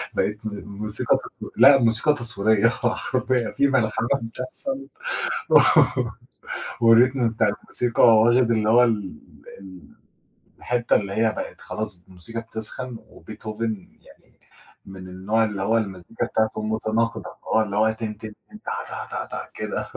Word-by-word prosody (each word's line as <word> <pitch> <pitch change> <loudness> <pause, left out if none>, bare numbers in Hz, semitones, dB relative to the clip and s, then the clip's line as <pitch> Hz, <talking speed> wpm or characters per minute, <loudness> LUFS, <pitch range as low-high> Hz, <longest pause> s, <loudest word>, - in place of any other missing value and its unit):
بقِت 105 - 0
م 110 - -1 0.2
موسيقى 105 +1 0
تصوير - - -10
لأ، 135 +3 +8
موسيقى 115 +6 +3
تصويرية، 115 -4 +2
حرفيًا، 125 0 -1
في 140 - +2
ملحمة 115 -3 +1
بتحصل، 130 - -6 2.0
والrhythm 120 +4 +6 0.2
بتاع 110 -2 +3
الموسيقى 120 -2 0
واخد 120 +2 +4
اللي 110 -2 +1
هو 120 +2 +6
ال 105 -7 -1 1.4
الحتة 120 -1 0
اللي 100 -1 -4
هي 110 0 +2
بقِت - - -7
خلاص 105 -5 -5
الموسيقى 95 +5 -6
بتسخن، 115 +2 -6
وبيتهوفن 110 -2 -6
يعني - - -22 0.5
من 95 -1 -10
النوع 100 +5 0
اللي 105 -2 -4
هو 110 +3 +2
المزيكا 100 +2 -3
بتاعتُه 110 -2 -1
متناقضة، 110 +1 -2
فهو 110 - +2
اللي 100 -2 -3
هو 110 +1 +3
تن، 110 -1 -5
تن، 110 -1 -8 0.2
تن 215 - -12
تا، 460 +1 -5
تا، - - -3
تا - - -7
كده، - - -3
110 Hz, 130 wpm, -23 LUFS, 105-120 Hz, 2.0 s, لأ